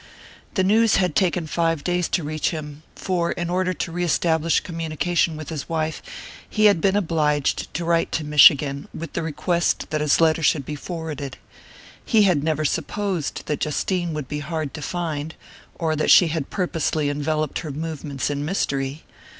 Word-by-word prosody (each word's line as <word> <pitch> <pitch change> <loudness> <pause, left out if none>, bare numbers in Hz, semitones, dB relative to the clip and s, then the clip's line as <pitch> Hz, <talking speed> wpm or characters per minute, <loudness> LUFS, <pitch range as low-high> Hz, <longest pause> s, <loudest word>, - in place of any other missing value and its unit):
The 190 - +2
news 220 +3 +4
had 180 -5 +1
taken 180 -2 +1
five 165 -1 0
days 180 -1 0
to 175 - 0
reach 155 +1 -1
him, 150 -2 -6
for 175 -3 -1
in 175 0 -3
order 185 0 +1
to 175 - -4
reestablish 165 -1 +1
communication 165 0 -1
with 155 -2 -7
his 155 -2 -5
wife 160 -1 -2 0.5
he 215 0 +2
had 200 -6 +5
been 195 +2 +2
obliged 155 -7 0
to 170 - -2
write 165 0 +1
to 160 - -1
Michigan, 145 -1 +5
with 165 -2 -7
the - - -2
request 170 +2 -1
that 155 -1 0
his 150 -1 +3
letter 165 0 +3
should 145 -2 +2
be 150 - -5
forwarded. 150 -4 -6 0.7
He 220 -3 +4
had 175 -8 +3
never 155 -1 0
supposed 175 +2 -2
that 150 - -2
Justine 175 +3 -1
would 150 -4 -4
be 150 +2 -4
hard 155 -1 -4
to 155 - -7
find, 160 -1 -3 0.4
or 160 -2 -1
that 155 - 0
she 175 - +7
had 155 -3 -3
purposely 160 -5 -1
enveloped 150 +1 -1
her 155 - -6
movements 145 -2 -4
in 145 0 -2
mystery. 140 -4 -2
160 Hz, 175 wpm, -23 LUFS, 150-175 Hz, 0.7 s, she